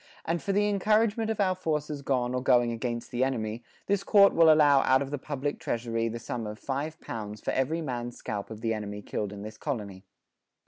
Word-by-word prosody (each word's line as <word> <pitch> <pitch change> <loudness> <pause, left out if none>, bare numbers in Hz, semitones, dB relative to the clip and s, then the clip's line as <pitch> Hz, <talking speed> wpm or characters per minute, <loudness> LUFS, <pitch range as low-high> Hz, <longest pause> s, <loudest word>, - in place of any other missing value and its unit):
[45:2]... - - -26 0.2
And 165 +1 -1
for 200 - -1
the 205 +1 +2
incouragement 215 +2 +2
of 220 -1 -2
our 190 -2 +3
forces 150 -5 -2
gone 125 -3 0
or 125 - -1
going 120 -2 +4
against 120 0 -4
the 125 +1 +1
enemy, 115 -3 -2 0.2
this 200 -1 +1
Court 200 -2 +6
will 165 -1 +7
allow 145 -3 +6
out 130 0 +3
of 135 - -8
the 145 - -3
publick 145 0 -3
treasurie 115 -6 -2
the 115 - -4
su[=m]e 115 -1 -4
of 105 - -7
five 145 +6 -4
pounds 105 -2 -6
for - - -2
every 155 +6 0
mans 120 -3 -4
scalp 105 -2 -5
of 110 -1 -8
the 115 -1 0
enemy 105 -1 -5
killed 105 -2 -3
in 100 0 -8
this 110 +1 -9
Colonie." 105 -9 -4
130 Hz, 220 wpm, -28 LUFS, 115-160 Hz, 0.2 s, will